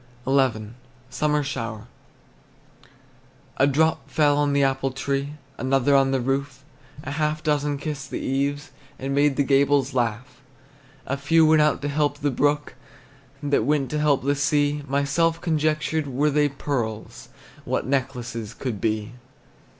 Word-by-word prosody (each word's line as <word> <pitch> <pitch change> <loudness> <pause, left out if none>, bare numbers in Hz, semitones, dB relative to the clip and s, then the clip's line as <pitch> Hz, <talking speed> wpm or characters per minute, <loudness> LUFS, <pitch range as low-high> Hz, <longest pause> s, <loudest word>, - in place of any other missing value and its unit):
XI. 130 -6 +1 0.4
SUMMER 150 -1 +1
SHOWER. 115 -5 -5 1.7
A 135 - +4
drop 160 +3 +1
fell 145 -2 +3
on 145 0 +1
the 140 0 +2
apple 135 0 +1
tree, 140 +2 -3 0.3
Another 135 +2 +2
on 135 -1 +4
the 135 0 +1
roof; 135 +2 -2 0.4
A 140 - -5
half 155 +1 -1
a - - -28
dozen 145 -1 0
kissed 145 -1 -5
the - - -4
eaves, 140 +2 -2 0.3
And 135 +1 -3
made 145 0 +3
the 140 - +2
gables 140 0 +2
laugh. 120 +2 -2 0.6
A 140 - -2
few 160 +4 +4
went 155 0 +5
out 150 -1 +1
to - - 0
help 145 0 0
the 145 -1 -1
brook, 145 +3 0 0.7
That 145 -5 +1
went 145 +1 0
to 150 - -1
help 150 -3 +2
the 140 +1 +2
sea. 145 +1 +1
Myself 140 +5 +1
conjectured, 155 -2 0
Were 140 +3 +1
they 145 0 +2
pearls, 120 -6 -4 0.3
What - - -2
necklaces 125 -5 -3
could 120 -7 -4
be! 110 0 -1
140 Hz, 150 wpm, -24 LUFS, 135-150 Hz, 1.7 s, went